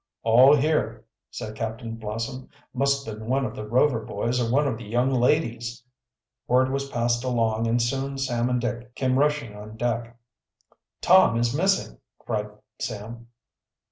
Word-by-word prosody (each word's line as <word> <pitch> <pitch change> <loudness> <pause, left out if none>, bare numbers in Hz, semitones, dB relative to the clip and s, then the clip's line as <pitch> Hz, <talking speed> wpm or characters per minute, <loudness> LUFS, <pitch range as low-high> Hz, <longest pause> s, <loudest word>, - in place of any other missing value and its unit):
"All 125 +6 +7
here," 150 +2 0 0.2
said 110 - -6
Captain 115 0 -4
Blossom. 115 +4 -5 0.2
"Must 140 +1 +1
have 110 -1 -6
been 110 - -9
one 135 +2 +1
of - - -5
the 105 - -6
Rover 125 +2 +3
boys 120 +4 -1
or 115 -1 -1
one 145 +3 +3
of 115 -4 -2
the - - -8
young 120 +5 0
ladies." 120 -3 0 0.6
Word 130 +1 +3
was 140 0 -2
passed 120 -1 0
along 115 -3 0
and 115 +1 +2
soon 135 +3 -1
Sam 125 -3 0
and 125 0 +1
Dick 120 0 -4
came 130 0 +1
rushing 145 -7 0
on 105 +1 -10
deck. 120 0 -2 0.8
"Tom 185 -10 +5
is 120 +2 0
missing!" 185 - 0 0.2
cried 105 -2 -3 0.3
Sam. 115 +1 -6
120 Hz, 160 wpm, -25 LUFS, 115-135 Hz, 0.8 s, All